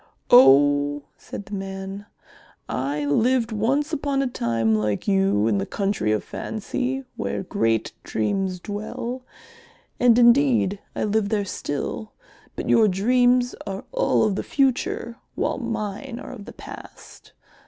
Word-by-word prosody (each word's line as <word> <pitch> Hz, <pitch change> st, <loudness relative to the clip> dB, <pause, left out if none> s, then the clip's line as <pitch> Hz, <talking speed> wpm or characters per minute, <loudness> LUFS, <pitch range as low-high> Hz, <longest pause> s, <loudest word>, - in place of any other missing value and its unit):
"Oh," 145 Hz, -, +6 dB
said 205 Hz, -, -9 dB
the 205 Hz, -, -11 dB
man, 195 Hz, +1 st, -6 dB, 0.6 s
"I 145 Hz, +3 st, -2 dB
lived 230 Hz, -, +2 dB
once 270 Hz, +9 st, 0 dB
upon 280 Hz, -2 st, 0 dB
a -, -, 0 dB
time 115 Hz, -, 0 dB
like 105 Hz, -, -1 dB
you 195 Hz, -, +2 dB
in 105 Hz, -3 st, +2 dB
the 95 Hz, -, -2 dB
Country 195 Hz, -, -1 dB
of 110 Hz, -, 0 dB
Fancy 255 Hz, +5 st, -3 dB
where 225 Hz, -, -3 dB
great 115 Hz, -10 st, 0 dB
Dreams 185 Hz, -, -1 dB
dwell, 215 Hz, +6 st, -5 dB, 0.8 s
and 245 Hz, -2 st, +5 dB
indeed 240 Hz, -5 st, +4 dB, 0.2 s
I -, -, -1 dB
live 210 Hz, -1 st, +1 dB
there 205 Hz, -2 st, 0 dB
still, 185 Hz, +5 st, -4 dB, 0.4 s
but -, -, -5 dB
your 220 Hz, -2 st, +5 dB
dreams 245 Hz, +5 st, +3 dB
are 195 Hz, 0 st, -4 dB
all -, -, +2 dB
of 215 Hz, -2 st, +2 dB
the 195 Hz, -, -2 dB
future 255 Hz, -3 st, 0 dB, 0.2 s
while -, -, -1 dB
mine 230 Hz, +1 st, -4 dB
are -, -, -8 dB
of 215 Hz, -6 st, -9 dB
the -, -, -10 dB
past. -, -, -12 dB
205 Hz, 140 wpm, -23 LUFS, 150-245 Hz, 0.8 s, Oh